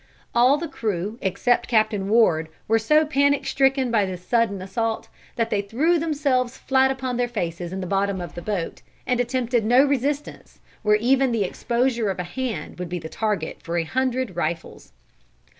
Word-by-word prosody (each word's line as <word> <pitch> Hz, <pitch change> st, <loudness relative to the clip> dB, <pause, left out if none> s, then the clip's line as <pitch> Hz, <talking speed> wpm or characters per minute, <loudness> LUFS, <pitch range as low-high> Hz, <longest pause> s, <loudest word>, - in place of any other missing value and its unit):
All 250 Hz, +4 st, +5 dB
the 335 Hz, +2 st, -4 dB
crew 215 Hz, -, -3 dB
except 240 Hz, +6 st, +1 dB
Captain 215 Hz, -4 st, +1 dB
Ward 170 Hz, -8 st, +3 dB, 0.2 s
were 225 Hz, +1 st, +3 dB
so 305 Hz, +8 st, +3 dB
panic 285 Hz, -1 st, +2 dB
stricken 270 Hz, -2 st, +2 dB
by 220 Hz, -3 st, +3 dB
this 180 Hz, -1 st, -7 dB
sudden 230 Hz, -5 st, +1 dB
assault, 220 Hz, +4 st, -3 dB, 0.3 s
that 230 Hz, -1 st, -1 dB
they 205 Hz, -, +1 dB
threw 285 Hz, +12 st, +1 dB
themselves 280 Hz, -6 st, 0 dB
flat 265 Hz, 0 st, +2 dB
upon 260 Hz, -2 st, -2 dB
their 245 Hz, 0 st, +1 dB
faces 175 Hz, -6 st, -4 dB
in 190 Hz, +1 st, -4 dB
the -, -, -3 dB
bottom 195 Hz, +1 st, 0 dB
of 175 Hz, -, -6 dB
the 175 Hz, -, -7 dB
boat, 195 Hz, -3 st, -3 dB, 0.2 s
and 250 Hz, -1 st, 0 dB
attempted 245 Hz, -1 st, 0 dB
no 245 Hz, +5 st, +5 dB
resistance 285 Hz, +1 st, -2 dB, 0.2 s
where 210 Hz, 0 st, +4 dB
even 255 Hz, +4 st, +2 dB
the 225 Hz, -3 st, +1 dB
exposure 235 Hz, +3 st, 0 dB
of 190 Hz, -, -2 dB
a 180 Hz, -, -2 dB
hand 180 Hz, -3 st, -5 dB
would 180 Hz, -1 st, -4 dB
be 180 Hz, -, -3 dB
the 160 Hz, -2 st, -7 dB
target 210 Hz, -6 st, -2 dB
for 170 Hz, +1 st, -3 dB
a 170 Hz, -, +1 dB
hundred 255 Hz, +1 st, -1 dB
rifles. 165 Hz, -, -4 dB
230 Hz, 180 wpm, -23 LUFS, 190-260 Hz, 0.3 s, All